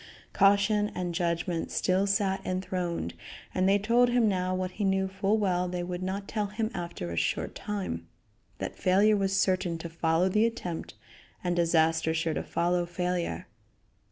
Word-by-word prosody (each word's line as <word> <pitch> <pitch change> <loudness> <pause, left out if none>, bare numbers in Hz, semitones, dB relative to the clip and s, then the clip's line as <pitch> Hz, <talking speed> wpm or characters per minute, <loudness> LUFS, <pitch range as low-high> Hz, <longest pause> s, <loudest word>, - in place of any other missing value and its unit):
Caution 205 +1 +3
and 180 -1 -2
judgment 170 0 -1
still 190 +2 +1
sat 195 -1 +1
enthroned, 180 - -2 0.4
and 185 +1 +2
they 200 - +5
told 235 +4 +3
him 240 -2 +3
now 185 -2 0
what 185 0 -2
he 205 - -4
knew 190 0 +2
full 195 +3 0
well 180 -4 +1
they 180 0 -3
would 180 0 -4
not 195 +2 -3
tell 210 -2 -1
him 220 +2 -2
after 170 - -5
a - - -4
short - - -1
time 185 - -4 0.5
that - - -5
failure 200 +4 +4
was 195 -1 +1
certain 185 -3 +1
to 165 +1 -6
follow 165 +2 +1
the 215 +4 +3
attempt, 180 -8 -5 0.5
and 175 -1 0
disaster 160 -1 +2
sure 165 0 0
to - - -2
follow 175 0 0
failure. 175 - -2
185 Hz, 165 wpm, -29 LUFS, 175-200 Hz, 0.5 s, they